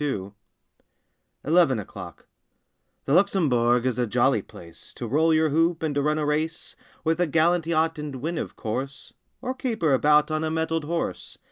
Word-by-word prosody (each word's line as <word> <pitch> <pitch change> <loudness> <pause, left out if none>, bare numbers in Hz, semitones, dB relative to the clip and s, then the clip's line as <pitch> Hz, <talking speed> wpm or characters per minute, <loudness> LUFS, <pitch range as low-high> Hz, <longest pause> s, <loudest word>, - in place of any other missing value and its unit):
• - - -1
TEN - - 0
O'CLOCK 100 -6 -5 1.1
19 150 - -2
ELEVEN 165 -9 +4
O'CLOCK - - -10
T - - -34 0.8
he - - -3
Luxembourg 135 -10 +3
is 125 -1 -1
a 120 - +1
jolly 105 - +2
place 85 -1 -14
To 120 - -5
roll 155 +8 +2
your 160 0 +3
hoop, 165 +2 +1
and 155 -2 -1
to 145 - 0
run 150 +2 +1
a 155 - -1
race 155 +2 -2 0.3
With 165 +1 0
a 175 - +2
gallant 165 +2 +2
yacht, 160 -1 +1
and 150 -2 -5
win, 160 +6 -3
of - - -6
course. 130 +5 -5 0.3
Or 255 - -2
caper 225 - -1
about 150 +3 +4
on 155 0 -1
a 160 - -1
mettled 160 0 -1
horse! 170 +2 -4
155 Hz, 195 wpm, -25 LUFS, 135-165 Hz, 1.1 s, ELEVEN